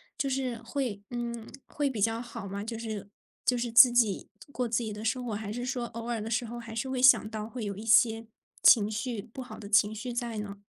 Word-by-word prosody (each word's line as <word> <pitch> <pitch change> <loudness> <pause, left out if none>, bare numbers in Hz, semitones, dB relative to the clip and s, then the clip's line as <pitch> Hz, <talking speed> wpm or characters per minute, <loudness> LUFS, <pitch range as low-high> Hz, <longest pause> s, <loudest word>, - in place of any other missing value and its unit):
就 280 -1 -1
是 260 -3 -2
会 235 -3 -3
嗯， 235 -2 -5
会 290 -1 -1
比 240 -5 -5
较 225 +3 +1
好 235 -4 -8
吗？ 200 +1 -5
就 225 +1 -5
是 220 -3 -6 0.3
就 250 - +2
是 240 -1 -2
自 245 +2 +9
己 230 -5 +2 0.2
过 250 -3 -2
自 235 +1 0
己 220 -2 -4
的 210 +1 -7
生 250 +3 -1
活， 230 - -3
还 205 0 -4
是 245 +3 -4
说 250 -2 -2
偶 230 0 -7
尔 235 -2 -2
的 220 - -5
时 235 +2 0
候， 240 +1 -7
还 225 -1 -9
是 230 +4 -2
会 260 -1 -2
想 250 -4 +7
到 215 0 -5
会 235 -2 -5
有 200 -1 -4
一 205 - -8
些 225 0 +4 0.3
情 210 -3 +7
绪 220 0 -3
不 235 +3 -9
好 250 - -9
的 205 - -9
情 205 +1 +4
绪 240 +3 -5
在 235 -2 -3
呢？ 205 -1 -5
230 Hz, 265 characters per minute, -29 LUFS, 215-245 Hz, 0.3 s, 自